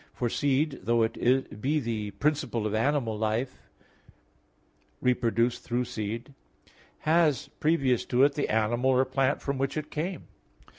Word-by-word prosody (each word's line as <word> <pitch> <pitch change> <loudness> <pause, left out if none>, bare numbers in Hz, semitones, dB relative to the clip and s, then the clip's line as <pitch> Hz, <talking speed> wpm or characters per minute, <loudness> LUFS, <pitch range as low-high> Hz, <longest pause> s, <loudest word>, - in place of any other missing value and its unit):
For 120 - -1
seed, 140 +3 0
though 115 +4 +2
it 120 -1 0
be 150 +5 +1
the 115 -5 -3
principle 120 0 -1
of 105 - -1
animal 120 0 +1
life 110 +4 -2 1.3
reproduced 120 -1 +1
through 120 +1 -1
seed, 115 +2 -5 0.7
has 155 -4 +2
previous 135 -6 +2
to 125 +1 +3
it, 140 0 +4
the 145 - -2
animal 115 +4 +1
or 130 0 +4
plant 130 0 0
from 140 -1 -2
which 135 +2 -1
is 155 - -2
came. 170 +4 -3
125 Hz, 140 wpm, -28 LUFS, 115-140 Hz, 1.3 s, it